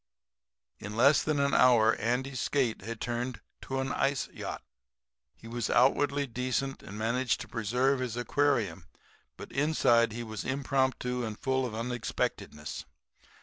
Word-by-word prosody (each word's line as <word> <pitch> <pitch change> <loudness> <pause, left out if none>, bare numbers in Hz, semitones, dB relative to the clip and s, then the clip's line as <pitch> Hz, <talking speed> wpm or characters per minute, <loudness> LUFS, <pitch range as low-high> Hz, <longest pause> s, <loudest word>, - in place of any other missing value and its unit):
"In 105 +1 -7
less 140 +5 +6
than 155 -2 0
an 140 0 +2
hour 115 -3 +6
Andy's 125 +4 -1
skate 130 -6 0
had 115 0 -6
turned 120 +1 -3 0.2
to 135 0 -3
an 135 0 -1
ice 135 0 0
yacht. - - -6 0.7
He 115 - -13
was 120 -2 -3
outwardly 140 +3 +3
decent 130 +2 -2
and 100 - -9
managed 120 +3 0
to - - -7
preserve 125 +5 +1
his 125 -2 -3
aquarium, 120 -7 0 0.5
but - - -9
inside 130 -6 +3
he 120 +2 -5
was 110 -2 -5
impromptu 130 -2 0
and 110 -2 -4
full 130 -2 0
of 110 - -7
unexpectedness. 115 -10 -3
125 Hz, 145 wpm, -30 LUFS, 115-135 Hz, 0.7 s, less